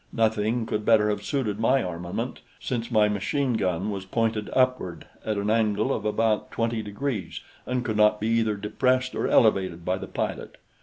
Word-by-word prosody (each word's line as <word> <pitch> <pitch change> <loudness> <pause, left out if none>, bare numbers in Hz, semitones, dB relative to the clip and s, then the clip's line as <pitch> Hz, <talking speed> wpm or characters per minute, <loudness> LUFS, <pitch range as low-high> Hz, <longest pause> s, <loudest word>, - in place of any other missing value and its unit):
Nothing 110 +1 +1
could 105 -1 -2
better 105 -1 +4
have 105 - -3
suited 115 -8 -2
my 130 +4 +3
armament, 90 +7 -4 0.2
since 120 -3 -3
my 110 -3 +4
machine 120 +6 0
gun 95 -1 -1
was 100 -2 -4
pointed 110 +1 -1
upward 125 -9 0 0.2
at 110 -1 -2
an 100 +1 0
angle 110 -2 +2
of - - -4
about 110 0 +1
45 115 -1 -1
degrees 105 +1 -4 0.3
and 125 -1 -1
could 110 -2 -1
not 105 0 +4
be 110 - -1
either 115 -2 +2
depressed 125 +5 0
or - - -1
elevated 95 -6 +3
by 95 +1 0
the - - -6
pilot. - - -4
110 Hz, 175 wpm, -26 LUFS, 105-115 Hz, 0.3 s, better